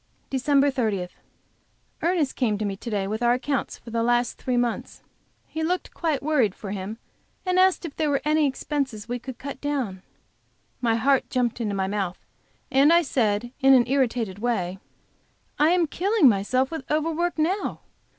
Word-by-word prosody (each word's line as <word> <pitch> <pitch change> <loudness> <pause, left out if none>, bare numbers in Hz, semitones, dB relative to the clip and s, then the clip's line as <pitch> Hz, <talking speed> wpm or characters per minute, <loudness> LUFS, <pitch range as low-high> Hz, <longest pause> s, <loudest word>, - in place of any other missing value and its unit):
DECEMBER 280 +1 +3
30. 215 -9 -1 0.9
Ernest 335 -5 +1
came 220 -5 +1
to 215 - -2
me 200 -1 -2
to 235 - -7
day 205 -3 -1
with 215 +4 -3
our 240 0 +4
accounts 270 +2 -2
for 235 - -12
the 230 0 0
last 240 +1 +1
three 250 -1 -1
months. 240 -1 -2 0.4
He 320 - -5
looked 360 +3 -1
quite 310 -6 -1
worried, 265 -10 +2
for 200 - -7
him, 200 +2 -5 0.5
and 365 0 +2
asked 375 0 +4
me 335 - -3
if - - -24
there 310 -2 +1
were 280 -1 +1
any 305 0 +3
expenses 265 -5 -3
we 245 +1 -3
could 255 0 -8
cut 280 0 -7
down. 260 -11 -2 0.8
My 230 -2 +2
heart 270 +3 +2
jumped 245 -2 0
up - - -5
into 210 -3 -1
my 190 -1 0
mouth, 190 -2 -3 0.5
and 275 +4 +5
I 340 +1 +5
said 235 -4 0
in 270 -1 +6
an 245 -2 +5
irritated 245 -7 0
way: 190 -6 -1 0.8
"I 300 +2 +5
am 350 -1 +3
killing 380 +2 +3
myself 255 +6 +2
with 320 -5 -6
over 310 +2 +1
work 345 +2 -1
now. 355 +6 -1
255 Hz, 185 wpm, -25 LUFS, 220-300 Hz, 0.9 s, in